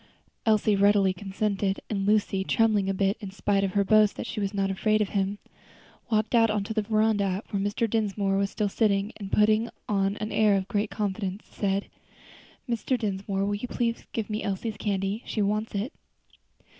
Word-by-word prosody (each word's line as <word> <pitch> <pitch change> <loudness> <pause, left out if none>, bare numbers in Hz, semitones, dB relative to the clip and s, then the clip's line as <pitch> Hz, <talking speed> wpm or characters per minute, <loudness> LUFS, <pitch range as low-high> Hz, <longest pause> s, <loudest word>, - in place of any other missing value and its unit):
Elsie 215 -1 +4
readily 200 -1 +4
consented, 195 +1 -1
and 195 -2 -2
Lucy, 205 -2 +2
trembling 210 -2 +2
a - - +3
little 195 0 +1
in 205 -3 -6
spite 200 0 0
of 190 -2 -1
her 200 - +3
boast 215 +1 +4
that - - -5
she - - -4
was 200 -1 -1
not 195 -1 0
afraid 215 +3 +1
of 210 -2 0
him, 200 0 -1 0.7
walked 215 0 +1
out 225 -1 +5
on 210 -1 0
to 220 - -4
the 215 - +1
veranda 210 -2 +1
where 200 -2 -1
Mr. 205 +3 0
Dinsmore 205 -3 0
was 195 0 +1
still 210 - -1
sitting, 200 0 +1
and 195 -2 -7
putting 215 +2 +3 0.2
on 195 0 0
an 215 +1 -4
air 210 -1 +4
of 190 0 -3
great 205 +1 -1
confidence, 195 -1 -3
said: 200 -1 -1 0.8
"Mr. 240 +2 0
Dinsmore, 195 -2 -2
will 205 - -1
you 205 +4 -3
please 235 -1 -1
to - - -20
give 220 -2 -3
me 215 0 -3
Elsie's 205 +3 -3
candy? 200 +1 -1
she 215 - 0
wants 210 +2 -1
it." 205 +7 -2
205 Hz, 195 wpm, -27 LUFS, 195-215 Hz, 0.8 s, out